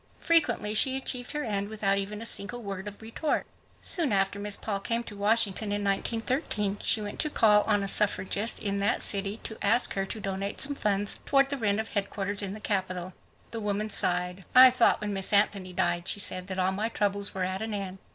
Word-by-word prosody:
Frequently 320 -10 +1
she 265 +4 +4
achieved 250 0 -3
her 295 0 -3
end 200 -3 -2
without 200 -2 0
even 210 +2 -5
a - - -7
single 230 +2 -3
word 195 -1 -6
Of 205 +2 -9
retort. 230 +7 -2 0.4
Soon 325 -8 +1
after 195 0 0
Miss 205 0 0
Paul 200 -3 -3
came 230 +4 -2
to 210 - -10
Washington 210 0 +1
in 205 0 -2
1913, 210 0 -1
;she 220 - +3
went 205 - -7
to 305 - +1
call 210 -6 +4
on 205 -2 +1
a - - -2
suffragist 205 +2 +2
in 200 -1 -2
that 200 - +1
city 200 +1 +2
to 220 - -4
ask 225 +4 +3
her 195 0 -2
to 220 - -6
donate 195 0 -4
;some 285 +1 +3
funds 205 -5 -1
toward 275 -1 +3
the 280 - -2
rent 210 -4 0
of 220 - -4
headquarters 200 0 -2
in 200 -1 -2
the 215 - -8
Capital. 185 -3 -3 0.4
The 230 - -5
woman 210 +1 -2
sighed. 180 +1 +1
"I 255 0 +9
thought 245 -3 +2
when 210 -1 -3
Miss 195 -1 0
Anthony 200 -2 +1
died," 175 0 -1
she - - +4
said, 185 -2 +1
"that 190 -1 -5
all 185 0 +1
my 210 +4 -2
troubles 200 -2 -1
were 190 - -2
at 185 +2 -3
an 220 -1 -3
end. 195 -1 -6
205 Hz, 215 wpm, -27 LUFS, 195-225 Hz, 0.4 s, I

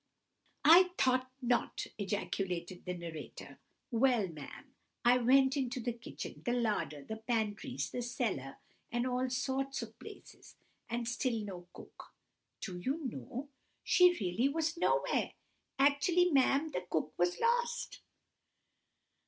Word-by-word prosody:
"I 355 +4 +9
thought 255 0 +2
not!" 240 0 0
ejaculated 185 -3 -3
the 180 0 -3
narrator. 165 -3 -8 0.3
"Well, 240 -3 +3
ma'am, 165 - -10 0.3
I 245 +1 +6
went 265 +3 +5
into 260 -2 -1
the 240 0 -2
kitchens, 235 +1 -8
the 240 - 0
larder, 210 - -1
the 220 +6 -6
pantries, 225 +2 -2
the 245 - -3
cellars, 225 - -2 0.4
and 240 +1 0
all 255 0 0
sorts 265 +2 -1
of - - -11
places, - - -12 0.3
and 235 0 -2
still 240 -1 0
no 180 -3 -8
cook! - - -13 0.5
Do 180 -3 -5
you 280 - -2
know, 245 - -5 0.3
she 360 -1 +5
really 200 +7 +1
was 320 +2 -1
nowhere! - - +1 0.4
Actually, 290 +6 +4
ma'am, 280 +2 +3
the 180 - -2
cook 155 -1 -1
was 175 0 +1
lost!" 475 +1 0
245 Hz, 130 wpm, -33 LUFS, 200-275 Hz, 0.5 s, I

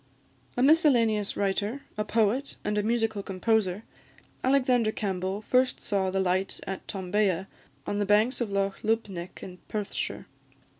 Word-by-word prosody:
A 250 - +3
miscellaneous 240 -9 +4
writer, 205 +6 -1
a 210 - -1
poet, 225 +5 0
and 210 0 0
a 210 - +2
musical 225 -1 0
composer, 200 0 0 0.6
Alexander 255 -4 +3
Campbell 195 -1 -2
first 255 +3 +2
saw 195 -2 0
the 190 +1 -1
light 190 +1 0
at 195 -1 -6
Tombea, 190 -1 0 0.4
on 205 - -2
the 205 - +1
banks 215 +6 +3
of 235 - 0
Loch 195 0 -1
Lubnaig, 205 -5 -2
in 180 -1 -9
Perthshire. 210 -2 -3
210 Hz, 140 wpm, -28 LUFS, 195-230 Hz, 0.6 s, miscellaneous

